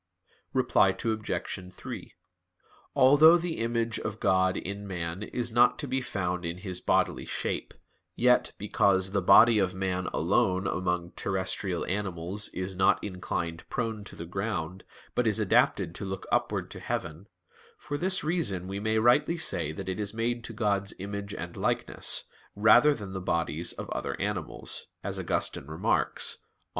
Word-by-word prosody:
Reply 125 -7 +3
Obj. 110 -4 -3
3: - - -8 0.8
Although 150 +6 +7
the 170 -1 -3
image 115 -1 0
of 110 0 -5
God 95 0 +2
in 100 +2 -5
man 85 -1 -4
is 120 +2 -3
not 120 +2 +5
to 145 - -4
be 130 +1 -1
found 90 -6 -2
in 85 +1 -3
his 90 -1 -5
bodily - - +1
shape, - - -3 0.4
yet 125 +1 +3
because 95 -2 +2
"the 100 -1 +1
body 110 +4 +7
of 95 -2 0
man 95 -1 -1
alone 95 +2 +1
among 90 -2 -1
terrestrial 95 -1 -2
animals 95 0 -2
is 95 +1 -5
not 95 +1 +3
inclined 85 -4 -4
prone 115 -3 -2
to - - -9
the 85 - -7
ground, 95 -1 -3 0.3
but - - +1
is - - +2
adapted 85 - +2
to - - -7
look 95 -1 -5
upward - - 0
to - - -7
heaven, 85 +5 -4 0.5
for 145 - -5
this 185 +5 0
reason 150 - -1
we 100 +1 -4
may 110 +1 0
rightly 145 +9 +4
say 85 - 0
that 95 +5 -7
it 95 +2 -3
is 105 0 -3
made 120 +1 -1
to - - -6
God's 100 -3 0
image 100 +1 -5
and 85 +1 -6
likeness, - - -1 0.3
rather 110 +8 +6
than 100 -5 -8
the 95 - -4
bodies 85 -1 -1
of - - -7
other - - -3
animals," - - -3 0.2
as - - -2
Augustine 70 - -1
remarks 80 +1 +1
(QQ. - - -32
100 Hz, 160 wpm, -28 LUFS, 90-115 Hz, 0.8 s, Although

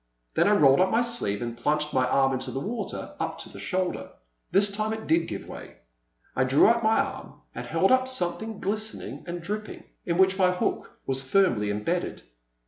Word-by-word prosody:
Then - - +3
I 210 - +4
rolled 140 -8 +5
up 185 +1 +4
my 230 - +2
sleeve 235 - 0
and 120 -1 -5
plunged 150 +5 -1
my 130 -1 +2
arm 135 +1 +2
into 130 0 -3
the 135 - -4
water 220 - -5
up - - -3
to - - -8
the - - -11
shoulder. 185 -1 -2 0.4
This 200 +2 +4
time 215 +2 -2
it 220 0 -6
did 165 +1 +2
give 100 -2 -6
way; - - -10 0.6
I 130 - +2
drew 130 +2 +4
out 235 +1 +3
my 220 0 +3
arm - - -4
and - - -7
held - - +2
up 260 0 +4
something 220 -2 +1
glistening 215 +3 -3
and 175 0 -5
dripping, 210 +4 -5 0.2
in 170 -1 0
which 190 +1 +3
my 180 -1 +4
hook 180 - -3
was 135 0 -1
firmly 130 - +2
imbedded. 105 +1 -2
180 Hz, 200 wpm, -26 LUFS, 135-215 Hz, 0.6 s, rolled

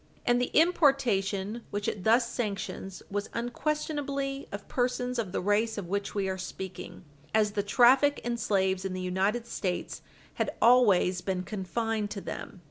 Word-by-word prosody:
And 245 -1 +3
the 250 - 0
importation 240 - +2
which 205 0 -3
it 195 - -3
thus 235 +3 +4
sanctions 200 -4 -4
was 205 +1 -2
unquestionably 275 +2 -2
of 200 0 -7
persons 250 0 -1
of 205 -6 -2
the - - -1
race 210 +4 +1
of 205 - -4
which 200 +1 -2
we 195 -2 0
are 190 0 -3
speaking, 185 0 -7 0.3
as 215 -1 +3
the 205 0 0
traffic 255 +7 +5
in 240 0 -1
slaves 190 -4 +1
in 190 -1 -3
the 185 - -4
United 190 +6 0
States 185 -6 -3 0.4
had - - -1
always 205 -7 +5
been 185 -1 -2
confined 215 +3 -2
to 205 - -5
them. 190 - -7
210 Hz, 160 wpm, -29 LUFS, 195-245 Hz, 0.4 s, traffic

